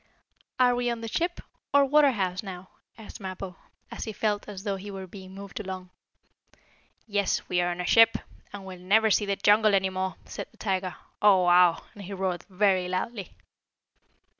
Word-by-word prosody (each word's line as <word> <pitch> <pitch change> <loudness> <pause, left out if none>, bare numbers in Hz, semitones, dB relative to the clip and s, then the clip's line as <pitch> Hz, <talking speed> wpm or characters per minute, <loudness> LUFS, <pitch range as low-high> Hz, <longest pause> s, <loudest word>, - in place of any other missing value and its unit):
"Are 250 -1 +5
we 245 0 0
on 235 -1 -3
the 225 - -5
ship, 345 +9 -2 0.3
or 280 0 +7
water 295 +1 +5
house, 190 -6 -1
now?" 185 -2 -9 0.3
asked 220 -2 -11
Mappo, 190 -1 -6 0.4
as - - -5
he 220 - -4
felt 210 0 -1
as 195 -2 -8
though 200 -2 -1
he 200 +2 -8
were 195 -1 -6
being 190 0 -11
moved 200 +1 -8
along. 185 -3 -7 1.1
"Yes, 205 -3 -1
we 180 0 +1
are 175 - 0
on 175 0 -4
a 180 - -2
ship, 225 +4 +6 0.3
and 200 -1 -8
we'll 185 -1 -9
never 215 +4 +3
see 205 0 +2
the 200 - +1
jungle 205 +1 +4
any 190 -1 +1
more," 185 -1 -2
said - - -7
the - - -26
tiger. 190 -3 -2 0.3
"Oh 195 -3 +6
wow!" 175 -1 +5
and 205 - -11
he 200 - -7
roared 185 -2 -2
very 190 -1 +2
loudly. 185 +2 -4
195 Hz, 190 wpm, -27 LUFS, 185-215 Hz, 1.1 s, or